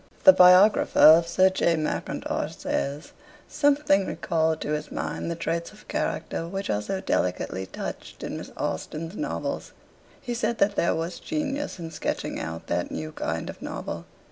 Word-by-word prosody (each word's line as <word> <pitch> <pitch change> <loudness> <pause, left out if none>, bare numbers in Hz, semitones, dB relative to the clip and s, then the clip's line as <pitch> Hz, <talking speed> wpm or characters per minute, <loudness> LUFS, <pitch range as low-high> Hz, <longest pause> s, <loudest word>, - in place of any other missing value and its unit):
The 285 - +10
biographer 185 +2 +6
of 165 +2 +8
Sir 190 +2 +4
J. 170 -2 +2
Mackintosh 155 -1 -3
says: 145 +3 -3 0.4
'Something 285 -10 +2
recalled 160 -1 0
to - - -3
his 150 0 -3
mind - - -3
the 170 - -2
traits 165 0 -3
of 210 - -18
character 165 - -2
which 195 +2 -3
are 105 0 0
so 190 - -3
delicately 95 - -1
touched - - -7
in - - -4
Miss - - -7
Austen's 165 +4 -4
novels... 300 - -4 0.5
He 245 - -4
said 235 0 -1
that 200 0 +2
there 170 - +2
was 165 +2 -4
genius 290 -4 -3
in 165 -2 -7
sketching 155 - -3
out 80 0 -5
that 85 0 -1
new 155 0 -5
kind 80 - -3
of - - -8
novel - - -5
170 Hz, 165 wpm, -26 LUFS, 155-200 Hz, 0.5 s, The